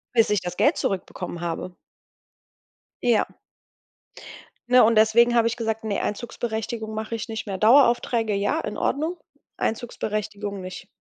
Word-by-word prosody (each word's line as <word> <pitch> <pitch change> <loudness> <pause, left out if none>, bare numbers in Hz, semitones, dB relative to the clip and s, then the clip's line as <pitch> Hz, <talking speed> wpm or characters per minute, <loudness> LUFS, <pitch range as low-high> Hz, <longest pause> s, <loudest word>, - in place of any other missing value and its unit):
Bis 225 -3 +4
ich 210 -3 +1
das 180 0 -5
Geld 290 - +3
zurückbekommen 180 -2 -3
habe. 175 +1 -4 1.3
Ja. 240 -3 +3 1.4
Ja, 250 0 +7
und 225 +1 +4
deswegen 235 +2 +5
habe 230 -1 +4
ich 230 - -2
gesagt: 225 -1 -2
„Ne, 210 -2 -1
Einzugsberechtigung 220 0 -4
mache 220 +1 -4
ich 225 - -5
nicht 220 -1 -5
mehr.“ 195 - -3
Daueraufträge, 235 -1 +4
ja, 200 0 0
in 210 - -5
Ordnung. 320 +5 -1 0.4
Einzugsberechtigung 210 -3 -3
nicht. 185 +1 -8
220 Hz, 135 wpm, -24 LUFS, 205-235 Hz, 1.4 s, Ja